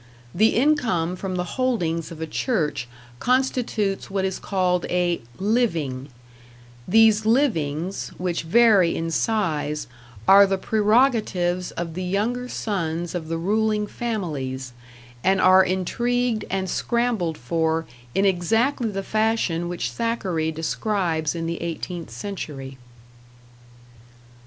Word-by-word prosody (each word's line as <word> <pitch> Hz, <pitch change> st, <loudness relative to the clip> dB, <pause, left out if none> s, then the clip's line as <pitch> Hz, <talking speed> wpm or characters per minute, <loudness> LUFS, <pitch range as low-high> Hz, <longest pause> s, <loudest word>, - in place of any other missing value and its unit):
The 215 Hz, +5 st, +3 dB
income 230 Hz, -, +2 dB
from 185 Hz, 0 st, -4 dB
the 180 Hz, -, -1 dB
holdings 175 Hz, -8 st, -1 dB
of 165 Hz, -, -9 dB
a -, -, -1 dB
church 155 Hz, -, -1 dB, 0.3 s
constitutes 245 Hz, -6 st, 0 dB
what 195 Hz, -1 st, -1 dB
is 190 Hz, -1 st, -2 dB
called 180 Hz, -2 st, 0 dB
a 175 Hz, -1 st, +1 dB, 0.2 s
"living"; 170 Hz, -, 0 dB, 0.8 s
these 220 Hz, +1 st, +5 dB
livings, 190 Hz, -, 0 dB
which 180 Hz, -1 st, -2 dB
vary 200 Hz, -1 st, +4 dB
in 165 Hz, 0 st, -2 dB
size, 155 Hz, -8 st, 0 dB, 0.4 s
are 200 Hz, +1 st, +8 dB
the 195 Hz, 0 st, 0 dB
prerogatives 210 Hz, -5 st, +2 dB
of 170 Hz, -1 st, -4 dB
the 185 Hz, -, -4 dB
younger 225 Hz, +7 st, -1 dB
sons 170 Hz, -7 st, -2 dB
of 170 Hz, -3 st, -4 dB
the 165 Hz, 0 st, -2 dB
ruling 210 Hz, +4 st, +1 dB
families, 145 Hz, -, -4 dB, 0.5 s
and 190 Hz, 0 st, +3 dB
are 185 Hz, +1 st, +7 dB
intrigued 235 Hz, +5 st, 0 dB
and 190 Hz, -1 st, -1 dB
scrambled 225 Hz, -7 st, 0 dB
for 160 Hz, +5 st, 0 dB, 0.3 s
in 195 Hz, -, +3 dB
exactly 225 Hz, -, +1 dB
the 195 Hz, -1 st, -4 dB
fashion 215 Hz, -6 st, 0 dB
which 175 Hz, -1 st, -3 dB
Thackeray 190 Hz, -9 st, -1 dB
describes 160 Hz, 0 st, -1 dB
in 165 Hz, -1 st, -3 dB
the 165 Hz, 0 st, -3 dB
eighteenth 170 Hz, -1 st, -5 dB
century. 135 Hz, -, -7 dB
185 Hz, 120 wpm, -23 LUFS, 165-220 Hz, 0.8 s, are